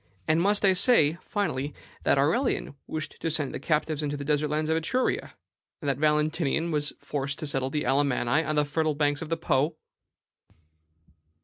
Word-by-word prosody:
And 160 +2 +3
must 205 +2 +2
I 190 - +6
say, 170 - +4
finally, 150 -9 -2 0.3
that - - +4
Aurelian 160 - +1
wished 155 -1 -5
to 165 - 0
send 150 -4 -1
the - - -4
captives 155 +1 0
into 145 -1 -2
the 140 - -6
desert 150 +1 +1
lands 155 +1 -1
of - - +3
Etruria, 205 +11 -1 0.4
and 150 - -6
that 140 -1 0
Valentinian 155 +1 +1
was 150 -1 0
forced 140 -1 -3
to - - -5
settle 135 -2 0
the 150 +2 -1
Alamanni 135 +2 +2
on 155 - -2
the 150 0 +3
fertile 155 +1 0
banks 145 0 +1
of 165 - -6
the 165 - 0
Po?" 155 -1 +1
150 Hz, 180 wpm, -27 LUFS, 145-160 Hz, 0.4 s, I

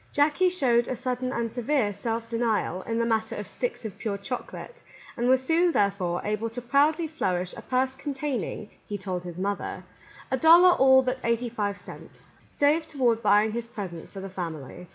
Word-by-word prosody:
Jackie 300 +5 +3
showed 245 -10 +2
a 255 - -2
sudden 255 +1 -2
and 235 -3 -2
severe 245 -2 0
self 230 +2 -3
denial 230 -6 -1
in 225 - -1
the 230 - +1
matter 220 -1 0
of 210 - -6
sticks 245 -2 -4
of 210 - -7
pure 205 -3 -2
chocolate, 250 - -7 0.3
and 240 +1 0
was 260 0 +4
soon, 335 +5 +3
therefore, 195 -4 0
able 210 +2 -1
to 230 +2 -6
proudly 285 +7 +2
flourish 185 - -2
a - - -8
purse 260 +1 0
containing, 270 -6 -4 0.2
he 205 - -3
told 185 -2 -4
his 175 -1 -8
mother, 200 +2 -3 0.5
"a 260 - +2
dollar 340 +5 +8
all 265 -5 +6
but 255 0 -2
eighty 235 +1 0
five 205 -3 -2
cents," - - -12 0.2
saved 300 +3 +1
toward 245 -6 +1
buying 210 +1 +4
his 235 +1 -4
presents 195 -8 -7
for 195 - -8
the 195 - -6
family. 170 -3 -7
235 Hz, 185 wpm, -26 LUFS, 205-265 Hz, 0.5 s, dollar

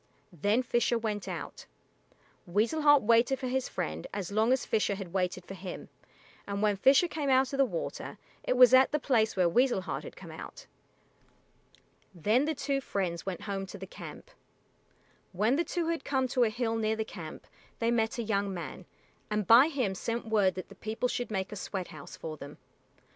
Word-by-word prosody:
Then 205 - +1
Fisher 240 0 +1
went 210 -4 -3
out. 175 -4 -6 0.8
Weasel 220 - +1
Heart 290 -3 +6
waited 235 +4 +4
for 260 - -5
his 260 +1 -1
friend 80 +1 -4
as 200 -2 -4
long 220 +4 +2
as 260 -1 +2
Fisher 210 -2 +1
had 190 -3 -8
waited 185 -1 -1
for 195 - -8
him, 185 -1 -8 0.6
and 200 +1 -2
when 210 -1 +3
Fisher 270 - +5
came 305 -4 -2
out 265 +1 +3
of - - -1
the 275 - +5
water 175 -9 -5 0.3
it 255 - 0
was 250 0 +8
at 260 +1 +7
the 300 - +2
place 230 -7 +1
where 185 -2 +3
Weasel 240 +3 +3
Heart - - -4
had - - -9
come - - -11
out. - - -9 1.5
Then 215 - +2
the 315 0 -1
two 275 0 -1
friends 185 -7 -3
went 185 -2 -3
home 195 -2 -4
to 200 - -8
the 190 - -7
camp. 190 - -10 1.0
When 215 +8 +2
the 335 - +2
two 340 -1 -2
had 330 -4 -2
come 265 -2 0
to 245 -1 +3
a - - +1
hill 225 +1 -1
near 220 0 +1
the 220 0 -2
camp 165 -7 -9 0.3
they 230 0 +1
met 225 -1 +1
a 235 - -1
young 200 -2 0
man, 175 -3 -6 0.4
and 210 -1 0
by 240 +7 +8
him 260 -11 -1
sent 230 +5 -3
word 205 -4 +3
that 185 - -7
the - - -11
people 220 +3 -2
should 245 - -3
make 195 -2 -2
a - - -5
sweat 190 -2 -5
house 155 -2 -10
for 155 -1 -6
them. 145 0 -10
220 Hz, 200 wpm, -30 LUFS, 190-255 Hz, 1.5 s, was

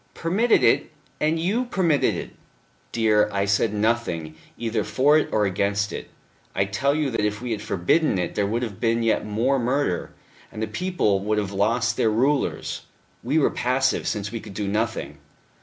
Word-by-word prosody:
"Permitted 205 +8 +2
it! - - +3 0.3
And 155 +2 +1
you 210 +10 0
permitted 175 - +1
it." - - -6 0.6
"Dear; 110 -2 +3
I 100 0 0
said 100 +2 +2
nothing, 105 -7 -1 0.2
either 115 -2 -1
for 145 +7 +3
it 155 - +2
or 105 -1 +2
against. 100 +1 0 0.6
I 100 - +2
tell 135 +9 0
you 150 -3 0
that - - -1
if 105 0 -1
we 125 0 -5
had 105 -2 -2
forbidden 110 - +1
it 90 -1 -2
there 100 -1 0
would 115 +4 -1
have 105 -5 -5
been 115 0 +1
yet 110 -2 +1
more 120 +6 +1
murder, 125 -6 0 0.4
and - - -8
the 110 - 0
people 175 - 0
would 105 +2 -1
have 100 -2 -1
lost 110 +5 +1
their 110 - +3
rulers. 135 +7 0 0.4
We 135 +6 0
were 155 - +3
passive, 130 +2 0
since 105 -2 -2
we 115 - -4
could 105 -3 -11
do 105 -1 -2
nothing." 110 +3 -2
115 Hz, 180 wpm, -24 LUFS, 100-140 Hz, 0.6 s, it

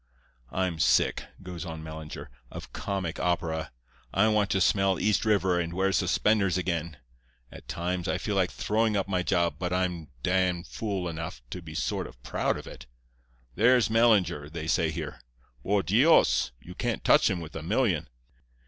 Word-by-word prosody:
I'm 90 -3 -1
sick,' 60 -4 +3 0.2
goes 90 -2 -6
on 80 -2 -7
Mellinger, 80 -1 -8 0.2
'of - - -9
comic 95 -5 -3
opera. 80 -3 -1 0.4
I 110 +3 +3
want 105 -2 +2
to 95 - +1
smell 95 +1 +3
East 105 +1 +1
River 95 -4 +2
and 85 0 -2
wear 95 +1 +2
suspenders 95 0 +2
again. 85 -4 -2 0.5
At - - -12
times 90 +1 -2
I - - 0
feel - - -3
like - - +2
throwing 110 0 0
up 100 - -1
my 95 -2 0
job, 85 -2 +1
but 90 -1 -2
I'm 90 -3 -1 0.2
d——n 90 -2 +1
fool 95 -2 -3
enough 80 -6 -6
to 90 - -5
be 80 -2 -10
sort - - -1
of - - -16
proud - - -1
of - - -9
it. - - -11 0.7
"There's 120 - +4
Mellinger," 105 -10 +3
they 80 0 -6
say 80 0 +2
here. 80 - -6 0.4
"Por 100 +6 +1
Dios! 125 - +4
you 90 - -11
can't 120 +3 -2
touch - - +5
him 90 - -1
with 80 -2 -9
a 80 - -4
million." 90 - +1
90 Hz, 170 wpm, -28 LUFS, 85-100 Hz, 0.7 s, touch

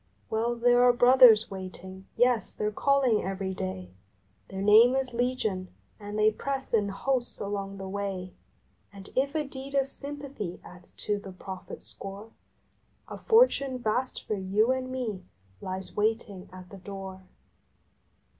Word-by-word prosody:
Well, 230 +2 0
there 245 +1 +4
are 245 0 +6
Brothers 245 -3 +7
waiting, 190 0 -8
yes, 245 -2 +2
they - - -4
re 210 - 0
calling 265 -1 +2
every 190 0 -3
day; 95 - -5 0.6
Their 190 0 -5
name 225 +5 +7
is 265 -2 -1
Legion, 235 -6 -1 0.3
and 205 0 -6
they 215 0 +4
press 270 +4 -4
in 210 -3 +2
hosts 245 +5 -2
along 200 -1 -4
the 195 0 -6
way. 190 -2 -4 0.6
And 195 -1 -12
if 275 +3 +1
a 310 - +1
deed 275 0 -8
of 275 -1 +2
Sympathy 280 -9 -7
adds 180 0 -14
to 205 -1 0
the 195 -1 -9
profit 185 0 -9
score, 200 +3 -9 0.8
A - - -7
fortune 445 - +4
vast 245 +2 -2
for - - -2
you 205 +4 +1
and 260 0 -2
me 235 -7 -4 0.4
lies 185 0 -6
waiting 210 -3 -1
at 185 0 -11
the 200 - -9
door. 190 0 -8
215 Hz, 150 wpm, -28 LUFS, 195-255 Hz, 0.8 s, Brothers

